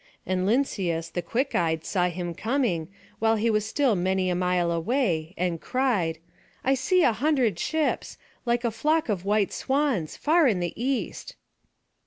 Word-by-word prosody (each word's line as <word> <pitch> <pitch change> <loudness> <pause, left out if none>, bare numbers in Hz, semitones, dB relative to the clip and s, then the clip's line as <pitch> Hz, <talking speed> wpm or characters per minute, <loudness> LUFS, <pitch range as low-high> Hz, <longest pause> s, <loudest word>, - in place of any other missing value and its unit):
And 185 0 0
Lynceus 190 -9 0
the 175 - -2
quick 250 +10 -1
eyed 160 -2 0
saw 180 -2 +1
him 175 0 -4
coming, 220 - -1 0.3
while 225 0 +3
he 225 +1 +1
was 215 0 0
still 260 -1 +2
many 185 0 0
a - - 0
mile 180 -1 +1
away, 170 - 0
and 175 -2 -1
cried: 215 -12 0 0.5
"I 265 - +3
see 300 +8 +2
a 235 - +4
hundred 250 - +1
ships, 315 -1 -1 0.3
like 240 0 0
a 235 - +1
flock 305 +6 +1
of 195 -3 -1
white 205 0 +1
swans, 265 - 0
far 320 0 +4
in 205 -7 +2
the 175 -1 -2
east." 260 +3 -3
210 Hz, 165 wpm, -26 LUFS, 175-260 Hz, 0.5 s, a